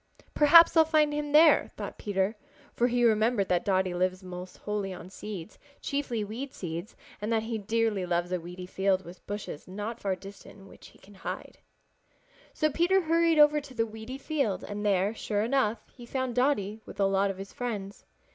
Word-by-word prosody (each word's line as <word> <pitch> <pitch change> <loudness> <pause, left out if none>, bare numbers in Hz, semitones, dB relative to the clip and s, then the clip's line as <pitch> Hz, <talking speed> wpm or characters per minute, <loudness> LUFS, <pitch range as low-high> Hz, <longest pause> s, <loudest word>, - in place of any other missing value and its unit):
"Perhaps 330 +4 +7
I'll 325 - +8
find 310 -2 +2
him 295 0 -3
there," 310 +2 +6
thought - - -6
Peter, 200 +1 -1 0.4
for 240 - +2
he 245 0 +1
remembered 220 -2 +3
that 180 -1 +2
Dotty 190 -2 +1
lives 185 +1 -1
almost 180 0 -8
wholly 210 -2 -3
on 180 0 -9
seeds, 195 -5 -8 0.2
chiefly 275 -6 -2
weed 240 +7 -6
seeds, 170 +4 -6 0.3
and 210 +2 -2
that 220 -1 +1
he 225 0 -3
dearly 220 -1 0
loves 175 0 0
a 180 - 0
weedy 180 +2 -8
field 190 0 0
with 175 +2 -12
bushes 205 -7 -6
not 210 +5 -5
far 195 -2 -1
distant 195 +2 -12
in 195 -1 -15
which - - -15
he - - -19
can 205 - -18
hide. 190 - -7 0.9
So 310 -1 0
Peter 350 +6 +3
hurried 330 0 +2
over 300 0 +6
to 275 -2 -13
the 225 -1 +1
weedy 220 +4 -8
field 275 - -1
and 205 0 -5
there, 200 0 +2
sure 210 -2 -1
enough, 235 -2 0
he 240 -2 -12
found 260 -1 -2
Dotty 225 -5 0
with 200 - -12
a 200 - +4
lot 195 +1 +2
of 195 - -4
his 195 +1 -9
friends. 205 -5 -5
210 Hz, 195 wpm, -28 LUFS, 190-260 Hz, 0.9 s, I'll